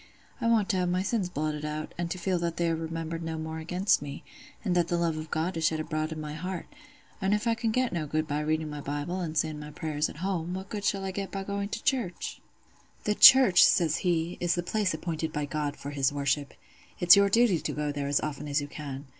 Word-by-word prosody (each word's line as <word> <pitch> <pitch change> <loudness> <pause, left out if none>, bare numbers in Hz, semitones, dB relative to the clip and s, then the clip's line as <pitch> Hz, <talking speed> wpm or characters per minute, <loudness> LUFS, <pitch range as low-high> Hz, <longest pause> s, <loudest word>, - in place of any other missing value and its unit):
I - - +1
want 225 -4 +3
to 195 - +2
have 180 -1 +1
my 180 +1 0
sins 200 -3 -1
blotted 150 -2 -3
out, 150 0 -4
and 175 -1 -3
to 185 - -3
feel 180 0 0
that 170 -1 -2
they 170 -1 +1
are - - +1
remembered 165 0 -4
no 165 -1 -4
more 160 0 -5
against 180 +5 +1
me, 140 -1 -7 0.4
and 185 - +1
that 175 -1 +2
the 175 - 0
love 170 -2 0
of 155 0 -6
God 165 +3 -1
is 160 - 0
shed 160 -2 -1
abroad 155 0 -2
in 160 - -5
my 150 -1 -5
heart; 180 +3 -5 0.6
and 195 +2 +2
if 210 +2 -3
I 230 - +3
can 230 0 -1
get 250 +1 0
no 160 -3 -2
good 155 +1 -1
by 145 0 -1
reading 155 +1 -1
my 150 -1 -6
Bible 145 +6 -3
an' 160 -3 -4
saying 155 -1 0
my 150 0 -8
prayers 150 0 -2
at - - -10
home, 180 -2 -2
what 190 +1 -7
good 205 -1 -4
shall 195 -2 0
I 190 - -2
get 195 +1 -4
by 195 -1 -4
going 200 0 -3
to 220 - -5
church?'" 245 - -2 0.6
"'The 210 - +1
church,' 210 -5 +9
says 160 -3 +4
he, 170 -2 0
'is 175 -1 +1
the 175 - -2
place 200 -2 0
appointed 160 -1 -3
by 150 -1 -2
God 145 0 -3
for 140 - -6
His 140 -2 +1
worship. 145 0 -1 0.4
It's 175 +1 +8
your 200 0 +4
duty 225 -4 +4
to 150 - -3
go 150 +1 -2
there 145 -1 -3
as 140 0 +2
often 150 -1 -4
as 145 +1 +1
you 145 - -4
can. 145 -1 -7
165 Hz, 255 wpm, -28 LUFS, 150-190 Hz, 0.6 s, church